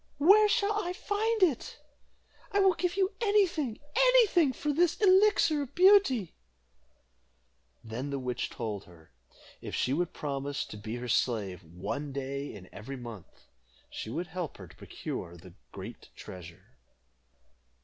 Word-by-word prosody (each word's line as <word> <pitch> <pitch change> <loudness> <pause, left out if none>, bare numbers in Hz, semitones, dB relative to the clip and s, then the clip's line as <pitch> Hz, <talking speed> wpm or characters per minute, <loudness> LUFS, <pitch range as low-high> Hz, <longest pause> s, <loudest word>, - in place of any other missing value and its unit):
"Where 405 +8 +6
shall 405 +1 +2
I 355 0 -3
find 425 +3 0
it? 300 -6 0 0.7
I 405 - +2
will 385 -1 +5
give 360 +2 -2
you 385 0 +2
any 415 -2 +4
thing 295 - -3 0.2
any - - +6
thing 340 -8 +3
for 295 +3 -2
this 345 +2 +2
Elixir 380 -6 +4
of 275 - -7
Beauty." 360 - +5 1.5
Then 115 +5 -5
the 140 - -2
witch 125 -2 -3
told 105 -4 -5
her, 80 -4 -18 0.5
if - - -5
she 130 - 0
would 175 +3 0
promise 140 0 -3
to 105 - -10
be 110 +2 -6
her 125 +1 -5
slave 100 -6 0
one 95 - -5
day 140 +1 -4
in 95 -3 -11
every 135 +7 -7
month, 115 -7 -11 0.5
she - - -6
would 170 +10 -3
help 175 -1 -5
her 95 - -10
to - - -17
procure 85 0 -7
the 90 0 -14 0.2
great - - -9
treasure. 85 -2 -12
165 Hz, 150 wpm, -30 LUFS, -, 1.5 s, Where